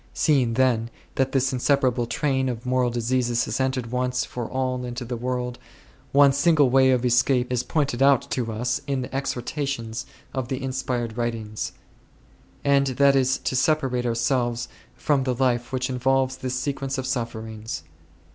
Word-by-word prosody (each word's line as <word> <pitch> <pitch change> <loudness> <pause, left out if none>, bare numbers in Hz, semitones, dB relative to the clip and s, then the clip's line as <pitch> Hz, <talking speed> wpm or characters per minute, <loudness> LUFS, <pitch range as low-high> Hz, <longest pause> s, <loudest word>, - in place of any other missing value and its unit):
Seeing, 130 -7 +2
then, 120 -3 +2 0.2
that 135 0 0
this 135 0 +1
inseparable 130 -2 +2
train 130 0 0
of 120 0 -5
moral 125 -1 +2
diseases 120 0 0
has - - -3
entered 130 -3 -1
once 125 0 0
for 120 -2 -5
all 130 -1 -1
into 120 0 -5
the 120 +1 -4
world, 125 0 -3 0.5
one 140 0 +6
single 145 -2 +4
way 130 0 +5
of 125 -1 +2
escape 125 +1 +2
is 120 - +1
pointed 135 -1 -1
out 135 -2 +5
to 120 -3 -1
us 120 +3 -1
in 135 -2 -1
the 125 - -7
exhortations 135 -3 -3 0.3
of 130 -2 -2
the 130 +1 -3
inspired 125 -3 -2
writings; 115 -3 -3 0.9
and 140 -1 +3
that 140 +2 +4
is 130 -1 +3
to - - -3
separate 130 -3 +1
ourselves 120 0 0 0.3
from 145 -3 +1
the 130 -1 0
life 120 -1 0
which 130 0 -1
involves 130 0 +1
this 130 -1 -3
sequence 135 0 -2
of 130 - -3
sufferings. 110 - -4
125 Hz, 160 wpm, -24 LUFS, 120-135 Hz, 0.9 s, one